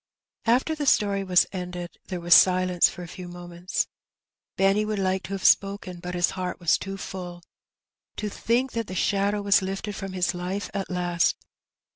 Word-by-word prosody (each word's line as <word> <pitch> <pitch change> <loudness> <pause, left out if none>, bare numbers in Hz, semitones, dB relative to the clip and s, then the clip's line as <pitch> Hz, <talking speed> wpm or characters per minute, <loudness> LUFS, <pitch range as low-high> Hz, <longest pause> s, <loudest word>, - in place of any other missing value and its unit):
After 250 +7 +2
the 300 -2 -3
story 200 -5 +3
was 180 -2 +4
ended 180 -2 -6
there 180 -2 -4
was 175 0 +4
silence 185 -1 +5
for 180 - -8
a - - -8
few 180 +1 -9
moments. 175 +1 -3 0.7
Benny 195 +2 +3
would 215 0 -2
like 190 -1 0
to 195 - -6
have 195 - -4
spoken^ 195 -3 +2
but 180 0 -5
his 175 0 +2
heart 185 -1 -4
was 170 -2 +3
too 195 0 -5
full 180 -3 -7 0.4
— - - -67
to 210 - -2
think 240 +5 0
that 230 -2 -3
the 185 - -6
shadow 200 +2 +1
was 200 0 +4
lifted 195 +2 -4
from 195 -1 -6
his 185 0 0
life 180 +2 -4
at 200 -2 -3
last! 175 -1 +1
190 Hz, 185 wpm, -25 LUFS, 180-200 Hz, 0.7 s, silence